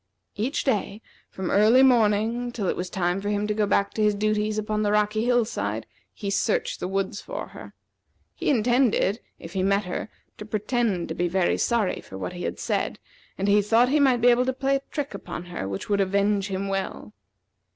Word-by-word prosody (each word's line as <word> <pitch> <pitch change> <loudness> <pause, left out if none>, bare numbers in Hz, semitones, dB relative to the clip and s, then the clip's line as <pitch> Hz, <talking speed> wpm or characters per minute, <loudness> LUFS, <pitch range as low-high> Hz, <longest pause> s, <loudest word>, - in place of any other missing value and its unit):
Each 230 +7 -1
day, 215 -5 -1 0.3
from 190 -2 -4
early 220 +6 +6
morning 235 0 +3
till 220 -4 -4
it - - 0
was 180 +1 -4
time 180 +1 -1
for 205 - -3
him 205 0 0
to 210 - 0
go 210 -1 +1
back 200 0 +1
to 220 - -2
his 210 -1 +3
duties 215 +1 0
upon 215 0 -1
the 205 -1 +1
rocky 210 +1 +1
hill 245 -2 +3
side, 110 - -3 0.3
he 200 -2 -5
searched - - 0
the - - -3
woods 195 +1 -2
for - - -6
her. - - -12 0.6
He - - -2
intended, 240 -4 +2 0.2
if 165 - -10
he 190 - 0
met 200 +2 +2
her, 180 +4 -4 0.3
to 210 - -7
pretend 215 -4 -1
to - - -2
be 175 +2 0
very 185 0 +1
sorry 230 -5 0
for 95 - -10
what 95 - -5
he 175 0 -5
had - - -3
said, - - -2 0.4
and 195 - -1
he 205 +1 +5
thought 230 +4 +3
he 300 +3 +3
might 260 -4 +3
be 245 - +6
able 245 +1 +3
to 260 - +1
play 275 +1 +1
a - - -9
trick 290 -2 -4
upon 175 - -7
her 175 - -5
which 95 0 -5
would 200 -1 +2
avenge 200 +1 +1
him 195 0 -3
well. 195 - -4
210 Hz, 215 wpm, -25 LUFS, 195-235 Hz, 0.6 s, early